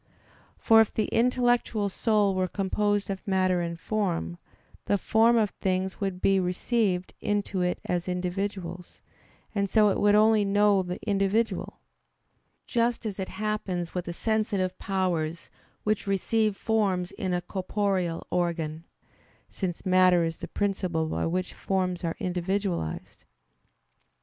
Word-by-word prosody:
For 225 0 +6
if 220 - +1
the 215 - 0
intellectual 240 -3 +2
soul 205 0 +2
were 185 0 0
composed 205 +2 0
of 195 +1 -6
matter 185 -2 +2
and 170 -1 -4
form, 175 -4 -2 0.5
the 205 - +2
forms 225 +4 +3
of 210 -2 +2
things 190 +1 -2
would 190 -2 -2
be 195 0 +4
received 185 +1 0
into 205 -2 -1
it 180 0 0
as 175 0 -1
individuals, 180 -1 -4 0.5
and 200 -2 0
so 210 +1 +5
it - - 0
would 205 0 +4
only 215 0 +5
know 205 0 +3
the 180 0 -5
individual: 205 +3 0 0.8
just 235 -2 0
as 205 -2 -4
it 190 - -3
happens 195 -5 -3
with 180 -1 -3
the 175 - -4
sensitive 205 -3 0
powers 175 -4 -2 0.3
which 210 -1 0
receive 210 +2 +1
forms 195 -5 0
in 185 - -3
a 180 - +1
corporeal 185 -1 -2
organ; 165 -2 -1 0.6
since 180 -4 -4
matter 185 -2 +5
is 165 -1 -3
the - - -6
principle 185 -5 -1
by - - -1
which 180 +2 -2
forms 185 -2 -1
are 165 -1 -1
individualized. 180 - -3
190 Hz, 135 wpm, -27 LUFS, 180-210 Hz, 0.8 s, For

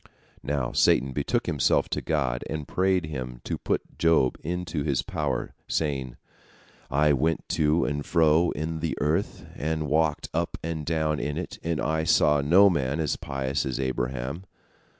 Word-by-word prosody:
Now 70 -3 -2
Satan 65 0 +3
betook - - 0
himself - - +2
to - - -2
God, 65 -6 -1
and 75 -2 -4
prayed 95 -2 +1
Him 65 -5 -6
to - - -3
put - - -3
Job 80 -6 +3
into 85 -1 -3
his 70 -4 0
power, - - -2
saying: 65 -5 -2 0.7
"I 75 +2 +3
went 80 +4 0
to 80 +1 +2
and 75 +1 -2
fro 80 +1 +3
in 80 +2 -3
the 80 0 -2
earth, 75 +2 -1
and 80 +1 -2
walked 75 0 +1
up - - -1
and 80 -2 -4
down 80 -2 0
in 75 +1 -3
it, 90 - -5
and 85 -1 -1
I 80 +1 0
saw 75 -3 +4
no 90 +8 +6
man 70 -5 0
as 80 -3 0
pious 70 +1 -2
as 65 -2 -3
Abraham. 65 +5 -3
75 Hz, 160 wpm, -26 LUFS, 70-80 Hz, 0.7 s, no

